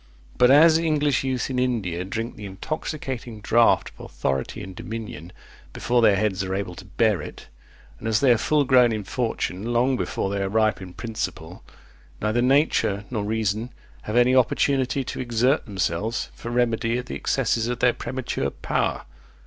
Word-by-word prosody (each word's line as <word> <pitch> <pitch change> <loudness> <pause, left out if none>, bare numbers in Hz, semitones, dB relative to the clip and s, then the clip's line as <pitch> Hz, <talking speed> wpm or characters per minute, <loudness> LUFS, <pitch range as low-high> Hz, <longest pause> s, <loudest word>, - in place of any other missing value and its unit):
But 125 - +5
as 160 +4 +7
English 150 -5 +1
youth 130 0 -2
in 125 - -1
India 105 -9 -1
drink 115 +5 -4
the 105 - -8
intoxicating 125 +1 -5
draught 115 +2 +3
of - - -8
authority 65 -1 -3
and 95 0 -9
dominion 110 -6 -7 0.4
before 120 0 +1
their 105 -3 +5
heads 100 -1 0
are 95 0 -3
able 95 -2 -3
to 90 - -11
bear 105 -1 +1
it, - - -10 0.5
and - - -5
as 110 -1 +2
they 135 -1 +4
are 120 - +5
full 150 +3 +2
grown 125 -3 +5
in 110 -2 -3
fortune 110 -1 -3
long 125 +2 +2
before 95 - -2
they 100 0 -1
are 95 - -1
ripe 110 0 +1
in 90 -1 -9
principle, 115 -2 -5 0.6
neither 110 +3 0
nature 120 -6 +2
nor 110 -4 -2
reason 110 +2 -2 0.3
have 105 - -5
any 125 +1 +5
opportunity 130 +1 +2
to - - -6
exert 125 +4 +1
themselves 100 +2 -2
for 120 - -8
remedy 120 -1 +1
of 125 - -4
the - - -7
excesses 115 -3 0
of 120 0 -2
their 125 0 +3
premature 130 - -3
power. - - -2
115 Hz, 175 wpm, -24 LUFS, 100-125 Hz, 0.6 s, as